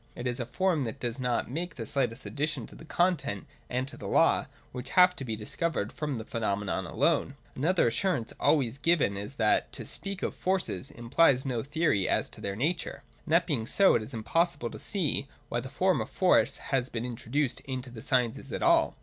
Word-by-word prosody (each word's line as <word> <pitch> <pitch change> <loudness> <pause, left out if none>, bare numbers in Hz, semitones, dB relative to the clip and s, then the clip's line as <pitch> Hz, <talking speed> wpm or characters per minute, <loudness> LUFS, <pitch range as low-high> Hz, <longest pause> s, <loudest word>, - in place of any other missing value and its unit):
It 120 - -6
is 125 +1 -1
a 120 - -3
form 180 0 +1
that 115 +4 -5
does 120 0 -3
not 125 -2 0
make 165 +5 -4
the 115 - -5
slightest 130 -3 0
addition 150 -4 -2
to - - -13
the - - -12
content 175 -3 0 0.2
and 125 +1 -1
to - - -8
the - - -7
law, - - +3 0.2
which 125 +1 -7
have 180 0 +7
to 135 - -4
be 115 -4 -3
discovered 110 +2 -2
from 150 -4 -3
the 110 - -6
pheno 110 -4 -1
menon 95 -2 -3
alone. - - +1 0.2
Another 165 +2 +2
assurance 125 -1 -1
always 135 -4 +2
given 145 -9 +3
is 100 +7 -6
that 110 -4 +2
to - - -5
speak 195 -1 -5
of - - -1
forces 185 -7 -1
implies 130 +1 +3
no 125 -4 -1
theory 145 - +1
as - - +1
to - - -11
their 100 -1 -3
nature: 160 - -2 0.2
and 155 - -1
that 170 +1 +5
being 125 -10 -1
so, 195 +7 +5
it 120 - +2
is 110 - -5
impossible 145 +2 0
to - - -8
see 170 -8 0 0.2
why 120 - 0
the 130 +2 -7
form 185 +5 +2
of - - -5
Force 185 -1 +3 0.2
has 130 -1 +2
been 115 0 -3
introduced 125 +3 -1
into 130 -1 -5
the 115 -2 -9
sciences 125 -2 0
at - - -3
all. - - +4
130 Hz, 210 wpm, -29 LUFS, 115-165 Hz, 0.2 s, have